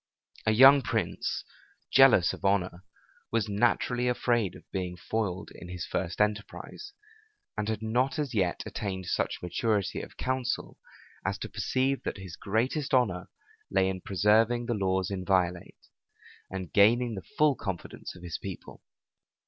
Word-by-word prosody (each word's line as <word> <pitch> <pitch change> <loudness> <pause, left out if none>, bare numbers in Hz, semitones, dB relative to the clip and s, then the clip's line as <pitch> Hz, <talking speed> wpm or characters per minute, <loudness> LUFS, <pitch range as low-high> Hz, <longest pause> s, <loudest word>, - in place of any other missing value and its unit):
A - - +5
young 135 +5 +8
prince, 115 - -2 0.5
jealous 130 -10 +6
of - - -10
honor, 95 -2 +1 0.5
was 115 -2 0
naturally 120 +3 +1
afraid 120 -5 +1
of - - -13
being 90 -2 -3
foiled 100 -1 -3
in 90 - -11
his 90 -2 -5
first 85 - -3
enterprise, 105 - -2 0.6
and 105 - -2
had 110 0 -2
not 125 +6 +1
as 145 -4 -2
yet 95 -5 0
attained 95 -3 -4
such 85 - -1
maturity 100 +2 0
of - - -11
counsel, 130 -1 -2 0.4
as - - -1
to - - -6
perceive 135 +1 0
that - - -4
his 95 -3 -8
greatest 130 +8 0
honor 105 -9 +1 0.4
lay 95 0 +2
in 95 -1 -3
preserving 110 +6 +3
the 120 - -1
laws 95 -2 0
inviolate, 90 -2 0 0.7
and 95 -3 -6
gaining 115 +4 +4
the 95 - -5 0.2
full 150 -3 +5
confidence 95 -6 -6
of 90 - -13
his 85 -3 -5
people. - - -8
105 Hz, 145 wpm, -29 LUFS, 95-120 Hz, 0.7 s, young